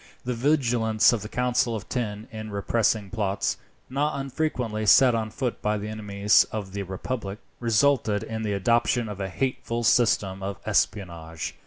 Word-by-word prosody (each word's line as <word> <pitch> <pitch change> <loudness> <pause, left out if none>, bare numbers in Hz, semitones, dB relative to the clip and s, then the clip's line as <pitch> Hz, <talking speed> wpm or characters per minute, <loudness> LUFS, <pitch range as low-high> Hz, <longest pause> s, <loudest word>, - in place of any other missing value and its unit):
The 125 - -1
vigilance 120 -5 +3
of 115 - -1
the 105 - -7
Council 125 -1 +1
of 105 - -6
Ten 110 -3 -3
in 110 -1 -7
repressing 105 0 0
plots, 100 -3 -1 0.3
not 140 +2 -1
unfrequently 125 -6 -2
set 125 +4 +7
on 110 -1 -1
foot 125 +2 -3
by 105 0 0
the 105 +1 -5
enemies 105 -1 +3
of 105 -3 -5
the 100 - -3
republic, 100 +2 -4 0.2
resulted 115 -2 +2
in 110 0 -5
the 105 -2 -1
adoption 115 +3 +2
of 105 -2 -7
a 95 - -3
hateful 120 +1 -2
system 100 -4 +2
of 100 0 -4
espionage. 85 -5 -1
110 Hz, 160 wpm, -25 LUFS, 100-120 Hz, 0.3 s, set